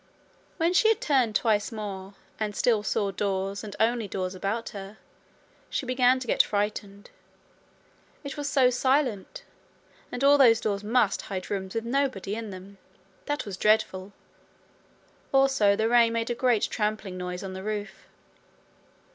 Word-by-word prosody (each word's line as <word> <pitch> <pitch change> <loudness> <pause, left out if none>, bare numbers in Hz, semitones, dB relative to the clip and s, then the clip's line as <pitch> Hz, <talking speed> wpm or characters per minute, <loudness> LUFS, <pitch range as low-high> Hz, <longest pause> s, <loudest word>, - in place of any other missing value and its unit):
When 335 +1 +1
she 440 +4 +5
had 445 - +2
turned 255 -7 +1
twice 210 0 +1
more, 200 -3 -6 0.2
and 210 -2 -2
still 225 -1 +2
saw 200 0 -1
doors 195 +1 -2
and 210 -2 -7
only 230 -1 +1
doors 185 -1 -3
about 200 +5 -3
her, 200 +1 -9 0.7
she - - -2
began 255 0 +3
to 255 - -6
get - - +4
frightened. 205 -1 -3 1.1
It 280 -1 -6
was 290 -1 -3
so 260 -3 +4
silent! 260 - 0 0.7
And 245 - -4
all 285 +1 +6
those 230 -4 +6
doors 205 -2 -2
must 215 -1 +2
hide 185 -2 -6
rooms 190 -1 -4
with 225 0 -2
nobody 245 -6 -1
in 225 0 -5
them! 190 +1 -11 0.5
That 290 0 -2
was 195 -3 -6
dreadful. 205 -2 +1 1.2
Also 270 -7 +4
the 220 +2 +1
rain 235 -1 +4
made 230 +1 -1
a - - +2
great 240 -3 +1
trampling 210 -3 -2
noise 180 0 -5
on 190 -1 -6
the 190 - -6
roof. 210 0 -5
215 Hz, 155 wpm, -27 LUFS, 200-250 Hz, 1.2 s, all